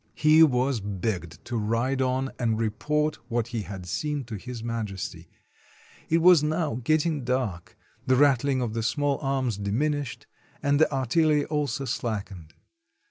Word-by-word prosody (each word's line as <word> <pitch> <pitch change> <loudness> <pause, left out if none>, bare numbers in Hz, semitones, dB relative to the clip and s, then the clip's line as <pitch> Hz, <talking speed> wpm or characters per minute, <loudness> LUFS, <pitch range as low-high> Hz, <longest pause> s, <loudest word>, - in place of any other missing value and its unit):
He 155 +1 +5
was 130 -4 +3
begged 95 -5 -4
to 120 - -3
ride 115 +5 0
on 130 +1 0
and 115 -3 0
report 150 +8 0
what 120 -1 -1
he 115 -3 -3
had 95 -3 -7
seen 145 - -2
to 120 -2 -7
His 120 +3 -7
Majesty. 110 -5 -5 0.8
It 165 +1 +2
was 180 -3 +7
now 150 -5 -1
getting 155 +1 +1
dark, 120 -9 -2 0.3
the 130 - +4
rattling 135 -1 +3
of 115 -3 -3
the 115 - -1
small 145 +4 0
arms 135 -6 -1
diminished, 135 +6 -2 0.4
and 140 0 +2
the 160 - +4
artillery 150 +3 +2
also 145 -3 -2
slack 110 -6 -3
ened. 80 -4 -12
130 Hz, 150 wpm, -26 LUFS, 110-145 Hz, 0.8 s, was